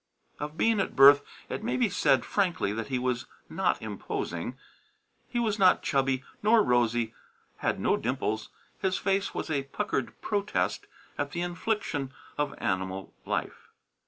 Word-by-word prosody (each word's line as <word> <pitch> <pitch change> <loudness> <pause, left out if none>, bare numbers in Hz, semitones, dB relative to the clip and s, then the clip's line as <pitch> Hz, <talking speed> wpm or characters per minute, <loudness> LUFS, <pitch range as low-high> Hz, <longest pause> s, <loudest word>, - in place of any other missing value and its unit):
Of 150 +2 -5
Bean 225 -2 +3
at 195 - -1
birth, 140 +1 +9 0.3
it - - -4
may 235 - 0
be 245 -2 +3
said 135 - +3
frankly 175 - +1
that 115 +1 -3
he 130 -2 -1
was 125 -1 -1 0.2
not - - +1
imposing. 90 +9 -4 0.7
He 240 - -3
was 220 -3 +1
not 185 -2 +5
chubby 135 -1 +1 0.2
nor 215 +1 +5
rosy; 120 - +2 0.4
had - - -1
no - - +2
dimples. 110 -4 -2 0.3
His 190 -1 +1
face 195 0 0
was - - -3
a 140 -3 +1
puckered 130 - -2
protest 205 -1 -1 0.3
at - - -2
the 175 - -2
infliction 175 -6 -2 0.2
of 145 -1 -1
animal 95 +1 -2
life. - - -3
145 Hz, 150 wpm, -29 LUFS, 120-200 Hz, 0.7 s, birth